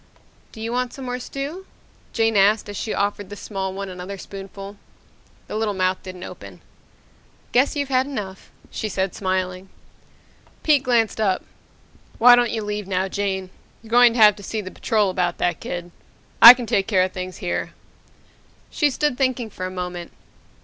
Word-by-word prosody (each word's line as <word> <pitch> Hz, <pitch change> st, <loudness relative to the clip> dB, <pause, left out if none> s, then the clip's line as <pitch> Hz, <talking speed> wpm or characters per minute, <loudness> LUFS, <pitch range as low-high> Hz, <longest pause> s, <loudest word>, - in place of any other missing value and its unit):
"Don't 220 Hz, -, -9 dB
you 230 Hz, -, -3 dB
want 250 Hz, 0 st, -1 dB
some 270 Hz, -, -8 dB
more 250 Hz, 0 st, -3 dB
stew?" 285 Hz, +9 st, -6 dB, 0.4 s
Jane 225 Hz, -1 st, +1 dB
asked 205 Hz, +2 st, +4 dB
as 205 Hz, -, -7 dB
she 215 Hz, -, -4 dB
offered 205 Hz, -1 st, -2 dB
the 205 Hz, -, -7 dB
small 195 Hz, -2 st, -4 dB
one 195 Hz, +1 st, -5 dB
another 185 Hz, +1 st, -7 dB
spoonful. 195 Hz, +1 st, -9 dB, 0.7 s
The -, -, -7 dB
little 215 Hz, -2 st, -1 dB
mouth 185 Hz, 0 st, 0 dB
didn't 185 Hz, -1 st, -9 dB
open. -, -, -10 dB, 0.9 s
"Guess 260 Hz, +5 st, +3 dB
you've 285 Hz, -2 st, -2 dB
had 260 Hz, 0 st, +2 dB
enough," 205 Hz, -9 st, -6 dB, 0.2 s
she 215 Hz, -, -4 dB
said, 190 Hz, -1 st, -2 dB
smiling. 185 Hz, -1 st, -2 dB, 0.9 s
Pete 295 Hz, -3 st, +4 dB
glanced 235 Hz, -4 st, +1 dB
up. 190 Hz, -3 st, +1 dB, 0.7 s
"Why 245 Hz, +1 st, +8 dB
don't 245 Hz, -1 st, +2 dB
you 220 Hz, -1 st, -3 dB
leave 210 Hz, -1 st, -4 dB
now, 190 Hz, 0 st, 0 dB
Jane. 190 Hz, -1 st, -3 dB, 0.3 s
You're 225 Hz, -, -14 dB
going 245 Hz, 0 st, +6 dB
to 240 Hz, -, -2 dB
have 210 Hz, -2 st, +7 dB
to -, -, -11 dB
see 220 Hz, -, -3 dB
the 185 Hz, -3 st, -6 dB
Patrol 210 Hz, -4 st, 0 dB
about 180 Hz, -2 st, -1 dB
that 175 Hz, -, 0 dB
kid. 175 Hz, 0 st, -6 dB, 0.5 s
I 235 Hz, +2 st, +13 dB
can 245 Hz, -1 st, -5 dB
take 195 Hz, -3 st, 0 dB
care 190 Hz, -4 st, +3 dB
of 185 Hz, -, -2 dB
things 185 Hz, 0 st, -6 dB
here." 175 Hz, -, -3 dB, 1.0 s
She 295 Hz, -, +2 dB
stood 290 Hz, -1 st, -1 dB
thinking 255 Hz, -4 st, 0 dB
for 185 Hz, -, -5 dB
a -, -, -5 dB
moment. 180 Hz, -2 st, -6 dB
205 Hz, 175 wpm, -22 LUFS, 185-240 Hz, 1.0 s, I